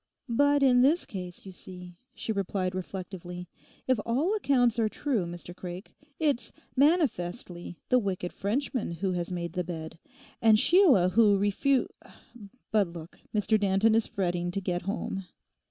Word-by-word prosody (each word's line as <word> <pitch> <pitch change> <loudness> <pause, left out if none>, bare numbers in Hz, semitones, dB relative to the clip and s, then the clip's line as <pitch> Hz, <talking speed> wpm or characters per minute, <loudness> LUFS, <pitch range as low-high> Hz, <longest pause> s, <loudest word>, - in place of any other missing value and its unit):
'But 285 +4 +3
in 250 -2 +5
this 300 +7 +3
case, 180 -2 -8
you 190 - -8
see,' 180 -1 -11 0.2
she - - -3
replied 195 -2 -1
reflectively, 180 -1 -6 0.4
'if 255 -3 +2
all 280 - +1
accounts 250 - +2
are 220 -1 +2
true, 230 - -1
Mr 175 +1 -9
Craik, 180 +2 -8 0.2
it's 290 -6 0 0.2
manifestly 225 - 0
the 250 - +5
wicked 185 -4 -3
Frenchman 230 -1 -2
who 185 +3 -2
has 175 0 -3
made 170 -2 -4
the 180 -1 -1
bed, 160 -2 -7 0.4
and 220 -2 +6
Sheila 280 - +5
who 205 +1 +5
refu—— 205 +7 +2 0.9
But 210 -3 +3
look; 170 0 -10
Mr 215 +1 +2
Danton 200 +2 +3
is 225 0 +2
fretting 175 -4 -1
to 180 - -2
get 180 -2 -2
home. 195 -1 -4
195 Hz, 150 wpm, -28 LUFS, 180-245 Hz, 0.9 s, and